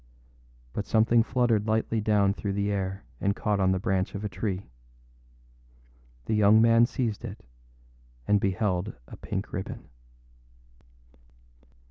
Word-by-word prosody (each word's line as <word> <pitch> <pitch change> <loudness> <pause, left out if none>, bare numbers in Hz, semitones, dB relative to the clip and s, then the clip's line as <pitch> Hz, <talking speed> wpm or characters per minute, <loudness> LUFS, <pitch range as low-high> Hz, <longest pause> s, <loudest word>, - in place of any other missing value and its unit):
But 105 - -4
something 115 +1 +4
fluttered 115 -2 +1
lightly 110 0 0
down 105 -2 +2
through 100 -1 -4
the 100 +1 -1
air 95 -1 -3 0.2
and 100 +1 0
caught 105 -2 0
on 95 -1 +3
the 95 - +1
branch 95 -1 -1
of 100 +1 -4
a - - -2
tree. 95 - -4 1.5
The - - -1
young 105 0 +5
man 115 +1 +5
seized 120 -4 -3
it, 110 - -8 0.8
and 105 -1 +3
beheld 95 0 -1
a - - -10
pink - - -5
ribbon. - - -6
105 Hz, 130 wpm, -27 LUFS, 100-110 Hz, 1.5 s, young